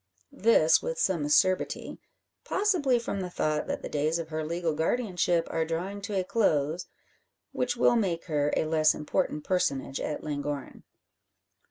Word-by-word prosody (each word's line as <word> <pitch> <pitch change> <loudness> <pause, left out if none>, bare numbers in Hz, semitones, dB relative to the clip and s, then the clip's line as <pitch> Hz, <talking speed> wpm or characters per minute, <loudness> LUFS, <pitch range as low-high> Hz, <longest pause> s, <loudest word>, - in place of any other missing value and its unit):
This 215 - +4
with 165 - -3
some 170 -4 +1
acerbity 185 +5 +1 0.4
possibly 355 -11 +2
from 230 -4 -3
the 180 - -4
thought 155 -3 -1
that - - -3
the - - -3
days 155 +3 0
of 165 -1 -5
her 155 0 -3
legal 170 +1 -1
guardianship 175 -1 0
are 165 - 0
drawing 175 +5 -4
to 200 -1 -2
a - - 0
close, 175 -5 0 0.6
which 250 -1 -1
will 240 - +4
make 185 -7 0
her 150 -3 0
a - - +1
less 155 -1 +3
important 150 0 -2
personage 140 -7 -1
at 150 - -4
Llangorren. 145 -2 -4
165 Hz, 155 wpm, -28 LUFS, 155-195 Hz, 0.6 s, This